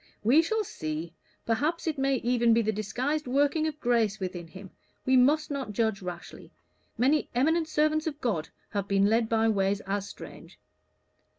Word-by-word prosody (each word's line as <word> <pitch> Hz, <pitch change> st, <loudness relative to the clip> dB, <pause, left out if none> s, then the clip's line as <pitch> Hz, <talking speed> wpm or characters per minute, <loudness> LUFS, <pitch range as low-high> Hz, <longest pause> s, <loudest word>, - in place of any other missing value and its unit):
"We 255 Hz, +9 st, +5 dB
shall 440 Hz, +6 st, -1 dB
see. 155 Hz, -, -5 dB, 0.3 s
Perhaps 295 Hz, +9 st, 0 dB
it 315 Hz, -4 st, -2 dB
may 270 Hz, 0 st, +2 dB
even 235 Hz, -2 st, +2 dB
be 230 Hz, -, +3 dB
the 220 Hz, -, +1 dB
disguised 250 Hz, +8 st, -2 dB
working 290 Hz, +4 st, +2 dB
of 305 Hz, -1 st, -5 dB
grace 230 Hz, -5 st, +1 dB
within 180 Hz, -3 st, -5 dB
him. 190 Hz, +3 st, -12 dB, 0.3 s
We 260 Hz, -, +3 dB
must 295 Hz, +5 st, +3 dB
not 270 Hz, -7 st, -4 dB
judge 220 Hz, -2 st, 0 dB
rashly. 180 Hz, -1 st, -8 dB, 0.5 s
Many 280 Hz, +5 st, +2 dB
eminent 320 Hz, +6 st, +2 dB
servants 310 Hz, 0 st, +1 dB
of 295 Hz, -2 st, -4 dB
God 200 Hz, -, -2 dB, 0.2 s
have 200 Hz, -1 st, -2 dB
been 195 Hz, 0 st, +3 dB
led 225 Hz, +2 st, +2 dB
by 225 Hz, 0 st, +2 dB
ways 200 Hz, -2 st, +1 dB
as 200 Hz, +1 st, -3 dB
strange." -, -, -12 dB
235 Hz, 170 wpm, -28 LUFS, 200-295 Hz, 0.5 s, We